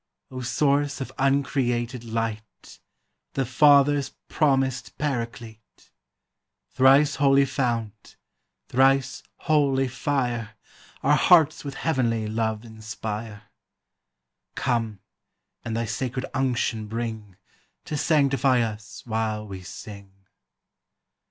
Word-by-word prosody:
O 130 Hz, -1 st, -6 dB
source 140 Hz, +3 st, +1 dB
of 135 Hz, -, -5 dB
uncreated 130 Hz, -3 st, 0 dB
light. 110 Hz, -2 st, -5 dB, 0.5 s
The 135 Hz, -, 0 dB
Father's 140 Hz, +1 st, +4 dB, 0.2 s
promised 135 Hz, -3 st, 0 dB
Paraclete! 120 Hz, -5 st, -5 dB, 0.8 s
Thrice 135 Hz, +3 st, +4 dB
holy 140 Hz, 0 st, +4 dB
fount, 115 Hz, -6 st, -3 dB, 0.5 s
thrice 135 Hz, +1 st, +2 dB, 0.2 s
holy 140 Hz, -3 st, +2 dB
fire. 120 Hz, -4 st, -2 dB, 0.5 s
Our 145 Hz, +2 st, +4 dB
hearts 160 Hz, 0 st, +4 dB
with 140 Hz, -2 st, -6 dB
heavenly 120 Hz, -8 st, 0 dB
love 110 Hz, 0 st, -2 dB
inspire; 110 Hz, -1 st, -7 dB, 1.1 s
Come, 115 Hz, -6 st, -1 dB, 0.6 s
and 115 Hz, 0 st, -3 dB
thy 115 Hz, -, -1 dB
sacred 130 Hz, +4 st, -3 dB
unction 125 Hz, -5 st, -1 dB
bring, 110 Hz, -4 st, -5 dB, 0.5 s
To 155 Hz, -, -4 dB
sanctify 140 Hz, -4 st, +2 dB
us 110 Hz, -1 st, -5 dB
while 110 Hz, -2 st, -2 dB
we 95 Hz, -2 st, -8 dB
sing. 100 Hz, +1 st, -10 dB
125 Hz, 95 wpm, -25 LUFS, 110-135 Hz, 1.1 s, Father's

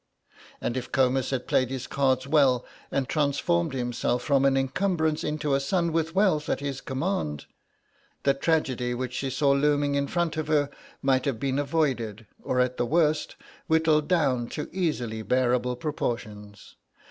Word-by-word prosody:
And 120 Hz, -, -2 dB
if 125 Hz, -1 st, -5 dB
Comus 130 Hz, -1 st, +2 dB
had 130 Hz, -2 st, -2 dB
played 130 Hz, -2 st, +2 dB
his 130 Hz, -1 st, -4 dB
cards 130 Hz, -2 st, +1 dB
well 135 Hz, -4 st, +3 dB, 0.2 s
and 135 Hz, -2 st, -1 dB
transformed 155 Hz, +2 st, +1 dB
himself 120 Hz, -1 st, -1 dB
from 140 Hz, -1 st, +3 dB
an 135 Hz, -1 st, +3 dB
encumbrance 160 Hz, +3 st, 0 dB
into 150 Hz, -1 st, -1 dB
a 135 Hz, -, +3 dB
son 170 Hz, +4 st, 0 dB
with 165 Hz, +1 st, -1 dB
wealth 180 Hz, -6 st, +2 dB
at -, -, 0 dB
his 140 Hz, -2 st, -4 dB
command, 130 Hz, -, -2 dB, 0.8 s
the 140 Hz, -, +4 dB
tragedy 135 Hz, -5 st, 0 dB
which 125 Hz, 0 st, -4 dB
she 135 Hz, +1 st, -2 dB
saw 140 Hz, +2 st, +2 dB
looming 145 Hz, 0 st, +2 dB
in 140 Hz, 0 st, 0 dB
front 170 Hz, -1 st, -1 dB
of 155 Hz, -1 st, -2 dB
her 145 Hz, -2 st, +2 dB, 0.3 s
might 135 Hz, 0 st, +2 dB
have 135 Hz, -6 st, -1 dB
been 135 Hz, +1 st, 0 dB
avoided 130 Hz, -8 st, -1 dB, 0.2 s
or 125 Hz, -, -1 dB
at 125 Hz, 0 st, +1 dB
the 120 Hz, -, +1 dB
worst 155 Hz, 0 st, +1 dB, 0.3 s
whittled 160 Hz, -2 st, +3 dB
down 135 Hz, -9 st, +1 dB
to 150 Hz, -, -6 dB
easily 125 Hz, -12 st, -1 dB
bearable 125 Hz, +1 st, +1 dB
proportions. 110 Hz, -7 st, -5 dB
140 Hz, 160 wpm, -26 LUFS, 125-155 Hz, 0.8 s, the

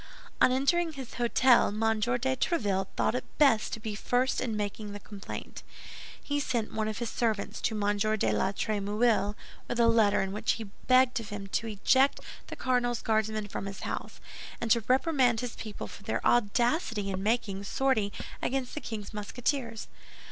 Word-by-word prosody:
On -, -, +6 dB
entering 320 Hz, +6 st, +2 dB
his 265 Hz, -4 st, -8 dB
hôtel, 240 Hz, +1 st, +5 dB
M. 220 Hz, +1 st, 0 dB
de 245 Hz, +4 st, +1 dB
Tréville 205 Hz, -, 0 dB
thought -, -, +2 dB
it 250 Hz, -, -5 dB
best 270 Hz, -7 st, +4 dB
to -, -, -3 dB
be 215 Hz, -1 st, -4 dB
first 245 Hz, +5 st, 0 dB
in 225 Hz, -4 st, -2 dB
making 205 Hz, 0 st, -4 dB
the 205 Hz, -, -6 dB
complaint. 200 Hz, -1 st, -8 dB, 0.6 s
He 290 Hz, 0 st, -1 dB
sent 235 Hz, -6 st, -2 dB
one 220 Hz, -1 st, -1 dB
of 215 Hz, -1 st, -3 dB
his 235 Hz, -2 st, -3 dB
servants 220 Hz, -4 st, -1 dB
to 220 Hz, -, 0 dB
M. 205 Hz, 0 st, +1 dB
de 215 Hz, -, +1 dB
la 150 Hz, -, +1 dB
Trémouille 210 Hz, +1 st, +1 dB, 0.3 s
with 240 Hz, -, -3 dB
a 235 Hz, -, +6 dB
letter 220 Hz, -3 st, +4 dB
in 190 Hz, -, -3 dB
which 210 Hz, -, 0 dB
he 230 Hz, -, -5 dB, 0.2 s
begged 255 Hz, 0 st, +5 dB
of 225 Hz, -, -8 dB
him 205 Hz, -1 st, -5 dB
to 225 Hz, -, -1 dB
eject 260 Hz, +6 st, +3 dB, 0.3 s
the -, -, -7 dB
cardinal's 245 Hz, -2 st, 0 dB
Guardsmen 215 Hz, -1 st, 0 dB
from 195 Hz, -, -5 dB
his 195 Hz, -, -7 dB
house, -, -, -5 dB, 0.4 s
and 230 Hz, -, -2 dB
to 235 Hz, -, +5 dB
reprimand 255 Hz, -3 st, +3 dB
his 245 Hz, -2 st, -5 dB
people 215 Hz, -2 st, -6 dB
for -, -, -11 dB
their 220 Hz, +3 st, -3 dB
audacity 235 Hz, -, +2 dB
in 190 Hz, 0 st, -3 dB
making 205 Hz, -2 st, 0 dB
sortie 220 Hz, -2 st, +1 dB, 0.3 s
against 260 Hz, -1 st, -2 dB
the 305 Hz, -, -4 dB
king's 215 Hz, -3 st, -6 dB
Musketeers. 230 Hz, +2 st, -2 dB
225 Hz, 175 wpm, -29 LUFS, 205-250 Hz, 0.6 s, On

